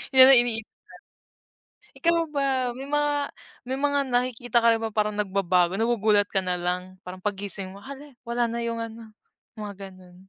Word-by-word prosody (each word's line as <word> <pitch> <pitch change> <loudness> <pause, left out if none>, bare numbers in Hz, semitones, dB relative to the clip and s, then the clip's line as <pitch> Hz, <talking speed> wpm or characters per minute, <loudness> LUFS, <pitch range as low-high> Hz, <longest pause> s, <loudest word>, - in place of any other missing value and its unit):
yan 260 +1 +10
ang 255 - +8
iniisip. 225 -3 -1 1.2
Ikaw 335 -1 +1
ba, 285 -2 -1 0.3
may 265 - -7
mga 295 -1 0 0.3
may 260 +1 -3
mga 285 0 +1
nakikita 245 -1 +1
ka 230 0 +4 0.2
parang 210 0 0
nag-babago, 190 -2 +1
nagugulat 215 -3 +2
ka 190 -1 -1
nalang, 180 +1 -3
parang 185 0 -9
pag-gising 195 -2 -2
mo 195 - -12
hala, 280 +5 -10 0.2
wala 235 -1 0
na 235 - -3
yung 230 -1 -2
ano, 225 -1 -10 0.4
mga 200 -3 -7
ganun. 185 -1 -17
225 Hz, 150 wpm, -25 LUFS, 195-255 Hz, 1.2 s, yan